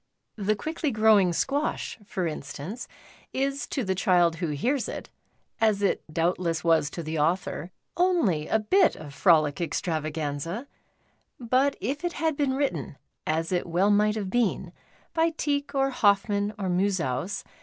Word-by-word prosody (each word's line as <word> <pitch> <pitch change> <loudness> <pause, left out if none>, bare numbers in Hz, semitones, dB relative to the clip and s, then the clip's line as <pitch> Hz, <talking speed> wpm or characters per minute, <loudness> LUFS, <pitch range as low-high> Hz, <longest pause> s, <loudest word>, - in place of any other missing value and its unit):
" - - -52
The 215 - +4
Quickly 315 - -2
Growing 215 -5 +4
Squash,"' 280 - -1
for 185 -4 -2
instance, 160 - -5 0.5
is 275 +1 -1
to 270 - -2
the 190 -2 0
child 175 -3 +3
who 170 -1 -2
hears 235 - -1
it, - - -7 0.5
as 215 -2 +2
it 200 - +2
doubtless 170 0 0
was 165 -4 +3
to 170 - -6
the 160 0 -3
author, 170 +1 0 0.3
only 290 - +2
a - - +3
bit 345 - +3
of 145 -2 -10
frolic 155 -3 +4
extravao 160 -2 -2
anza; 160 - -3 0.7
but 255 +3 +2
if 275 - -3
it 350 -1 -1
had 320 -2 0
been 280 -2 +1
written 175 - -2 0.2
— - - -20
as 165 +2 -2
it 180 -1 0
well 180 +5 +2
might 210 +1 +3
have 200 -4 -3
been 195 -7 0 0.2
— - - -33
by 330 0 +3
Tieck 285 -1 -1
or 270 0 +2
Hoffmann 205 -2 +2
or 195 -2 -3
Musaus. 180 -3 0
200 Hz, 165 wpm, -27 LUFS, 165-260 Hz, 0.7 s, The